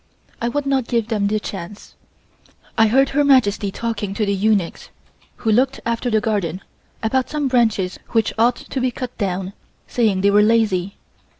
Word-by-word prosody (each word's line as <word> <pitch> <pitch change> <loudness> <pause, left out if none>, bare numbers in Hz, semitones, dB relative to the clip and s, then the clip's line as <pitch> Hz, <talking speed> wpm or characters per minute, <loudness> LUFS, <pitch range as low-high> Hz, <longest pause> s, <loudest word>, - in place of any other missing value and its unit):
I 235 - 0
would 290 +3 -2
not 270 -3 0
give 230 -2 -1
them 210 -3 +1
the 215 +1 0
chance. 200 0 -8 0.8
I 225 - +5
heard 270 +5 +3
Her 290 +1 +2
Majesty 225 -8 +3
talking 205 -1 -4
to 215 - 0
the 200 - 0
eunuchs 200 -3 0 0.5
who 220 - -1
looked 255 +5 +2
after 235 +1 -1
the 220 -2 +2
garden, 200 -5 -2 0.4
about 255 +3 0
some 300 -2 -1
branches 220 -7 +1
which 225 -2 +1
ought 235 +2 +3
to 265 - -5
be 255 - +2
cut 250 0 -6
down, 190 -1 -2 0.3
saying 215 -6 +1
they 200 +1 +4
were 205 +1 +5
lazy. 210 -4 +1
220 Hz, 175 wpm, -20 LUFS, 200-245 Hz, 0.8 s, I